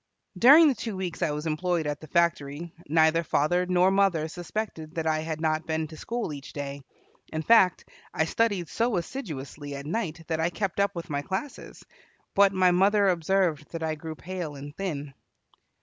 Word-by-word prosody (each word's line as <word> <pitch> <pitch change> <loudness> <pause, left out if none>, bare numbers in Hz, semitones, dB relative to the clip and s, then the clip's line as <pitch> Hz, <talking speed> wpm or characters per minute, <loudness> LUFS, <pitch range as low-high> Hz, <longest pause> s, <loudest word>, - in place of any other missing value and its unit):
During 285 - +8
the 285 - +4
two 225 -5 -5
weeks 185 -2 -4
I 170 - +2
was 150 +1 -3
employed 165 +1 0
at 145 -1 -2
the 155 - -10
factory 165 -1 0 0.2
neither 160 +1 +4
father 175 +4 +1
nor 180 +1 +4
mother 195 -5 +2
suspected 175 -2 -5
that 165 -1 -2
I 155 -1 +1
had 160 0 -4
not 155 0 0
been 160 0 -1
to 160 - -10
school 230 -1 -4
each 140 -1 -9
day. 140 -1 -5 0.5
In 155 0 -3
fact, 190 -2 +4 0.2
I 160 - +1
studied 200 -1 0
so 230 +1 0
assiduously 150 - -6
at 140 0 -7
night 165 -2 -3
that 160 -1 -1
I 165 +1 +2
kept 195 +1 -3
up 200 0 +1
with 170 -1 -6
my 145 0 -1
classes. 190 - -6 0.5
But 200 0 +5
my 185 -2 +4
mother 200 +2 +4
observed 170 -3 +1
that 165 -1 -4
I 160 -1 0
grew 155 +1 -7
pale 175 -3 -6
and 145 +2 -9
thin. 150 -8 -4
165 Hz, 185 wpm, -27 LUFS, 155-190 Hz, 0.5 s, During